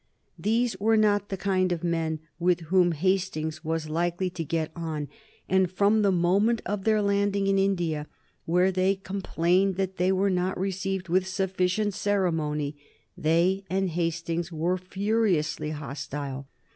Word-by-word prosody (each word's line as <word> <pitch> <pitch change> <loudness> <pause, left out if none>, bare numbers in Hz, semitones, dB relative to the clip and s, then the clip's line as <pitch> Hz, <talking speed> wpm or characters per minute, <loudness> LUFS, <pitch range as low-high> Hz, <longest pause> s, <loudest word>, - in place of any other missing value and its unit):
These 225 +1 +1
were 220 +2 +3
not 205 -2 +2
the 195 - -3
kind 185 -1 +1
of 175 -1 -2
men 165 -2 -1 0.2
with 175 0 +2
whom 180 -2 +4
Hastings 160 -2 -1
was 160 -1 -2
likely 175 +3 -1
to 170 -2 -4
get 160 0 -2
on, 160 -3 -4 0.4
and 190 -1 +3
from 205 +3 +3
the 200 -1 +3
moment 195 +6 +2
of 195 0 -3
their 215 -1 +3
landing 200 0 +1
in 195 0 +2
India, 170 -6 0 0.4
where 180 +3 +3
they 190 +1 +2
complained 190 -1 0
that 190 0 -2
they 180 +2 +2
were 190 +1 +2
not 180 0 -1
received 190 0 -2
with 185 +2 +1
sufficient 190 +2 0
ceremony, 160 -8 0 0.4
they 175 +5 +2
and 190 0 0
Hastings 170 +1 -2
were 170 +3 0
furiously 185 -6 0
hostile. 140 -2 -5
185 Hz, 145 wpm, -27 LUFS, 165-195 Hz, 0.4 s, whom